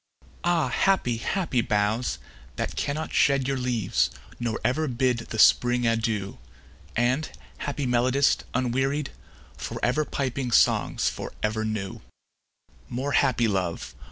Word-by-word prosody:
Ah, 175 -2 +2
happy, 185 -12 +2
happy 150 0 0
boughs! 105 - 0 0.4
that - - -3
cannot 150 +3 -2
shed 140 -2 +3
Your 135 0 0
leaves, 125 -5 +1 0.3
nor 115 -2 -2
ever 155 +5 +1
bid 125 -1 +1
the 115 -1 -7
Spring 120 +3 +5
adieu; 110 - -1 0.6
And, 125 +6 +1 0.3
happy 145 -1 -3
melodist, 125 +3 +2
unwearied, 135 +3 0 0.5
For - - -5
ever 125 +6 +2
piping 135 -3 -2
songs 115 - +3
for - - -4
ever 110 0 0
new; 105 -3 -4 0.9
More 130 +4 -2
happy 125 -5 +3
love! 90 - -2
125 Hz, 125 wpm, -26 LUFS, 115-140 Hz, 0.9 s, Spring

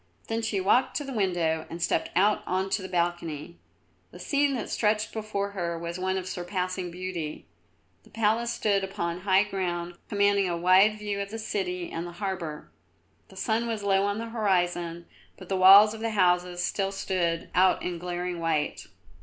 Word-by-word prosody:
Then 225 0 -1
she 220 -3 -1
walked 240 +7 +2
to 295 - -1
the 270 -1 -6
window 175 -7 0
and 165 - -7
stepped 170 - 0
out 205 +3 +3
on 190 +1 -1
to - - +1
the 190 - -7
balcony. 170 -3 -2 0.5
The - - -13
scene 280 -2 +1
which 225 - -5
stretched 215 0 0
before 210 -2 -3
her 170 -4 -3
was 170 +1 -5
one 190 +1 0
of 185 -1 -4
surpassing 185 0 -3
beauty. 175 -3 -5 0.6
The - - -20
palace 225 +2 +1
stood 200 -4 +1
upon 170 -3 -3
high 190 +1 +4
ground 175 -4 -3 0.2
commanding 200 -2 +2
a 170 - -1
wide 190 +5 +5
view 205 -1 -3
of 200 - -5
the 225 - -6
city 180 -5 -3
and 165 +1 -4
the 175 - -9
harbour. 175 -5 -5 0.6
The - - -16
sun 230 0 0
was 220 -3 -3
low 195 -1 +3
on 205 0 -1
the 230 +1 -5
horizon, 175 -6 0 0.3
but 185 - -12
the 195 - 0
walls 200 +3 +8
of 220 - -8
the 225 +1 -1
houses 180 -3 +2
still 195 -1 -1
stood 175 -4 -2
out 185 0 +3
in 175 -1 -3
glaring 175 0 -4
white. 160 -3 -1
190 Hz, 185 wpm, -27 LUFS, 175-210 Hz, 0.6 s, walls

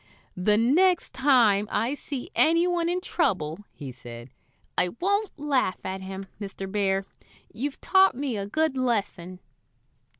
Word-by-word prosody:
"The 210 +3 +2
next 340 - +3
time 235 -7 +4
I 240 +4 0
see 280 -3 -6
any 335 +2 +4
one 345 -1 0
in 360 +1 -1
trouble," 185 - -1
he 140 -4 -8
said, 120 0 -11 0.4
"I 180 - +2
won't 405 +2 0
laugh 280 -9 0
at 190 0 -4
him, 190 +1 -7
Mr. 195 -1 -6
Bear. 195 -1 0 0.5
You've 270 +6 -4
taught 385 -4 +4
me 270 -2 -2
a 200 -1 -3
good 315 +5 0
lesson." 200 -8 -2
230 Hz, 140 wpm, -26 LUFS, 190-310 Hz, 0.5 s, time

